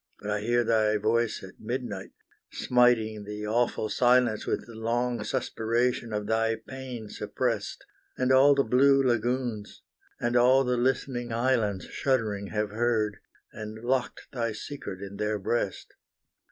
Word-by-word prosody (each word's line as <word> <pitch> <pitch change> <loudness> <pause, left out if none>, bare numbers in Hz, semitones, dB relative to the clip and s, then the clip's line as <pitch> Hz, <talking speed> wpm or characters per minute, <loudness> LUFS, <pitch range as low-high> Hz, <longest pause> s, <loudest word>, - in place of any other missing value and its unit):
But 105 - -4
I 105 - 0
hear 120 +3 +1
thy 110 -2 +2
voice 110 +1 0
at 95 - -12
midnight, 115 -4 -4 0.4
smiting 115 -4 +2
the 105 +1 -6
awful 115 0 0
silence 120 -1 +3
With - - -1
the 115 - -12
long 120 +2 -1
suspiration 115 +1 -1
of 105 -1 -2
thy 115 +1 +1
pain 125 0 -8
suppressed; - - -3 0.3
And 130 0 +1
all 135 +2 +6
the 140 - +3
blue 135 +3 +4
lagoons, 120 -2 -1 0.4
and 120 +1 -1
all 130 +2 +5
the 125 -1 0
listening 120 -1 -1
islands 115 -6 +1
Shuddering 110 -7 -1
have 105 -1 -2
heard, 110 -2 0 0.4
and 110 0 -7
locked 125 0 -1
thy 115 -3 -2
secret 105 -5 -7
in 100 0 -8
their 105 0 -1
breast! 100 0 -2
115 Hz, 140 wpm, -28 LUFS, 105-125 Hz, 0.4 s, all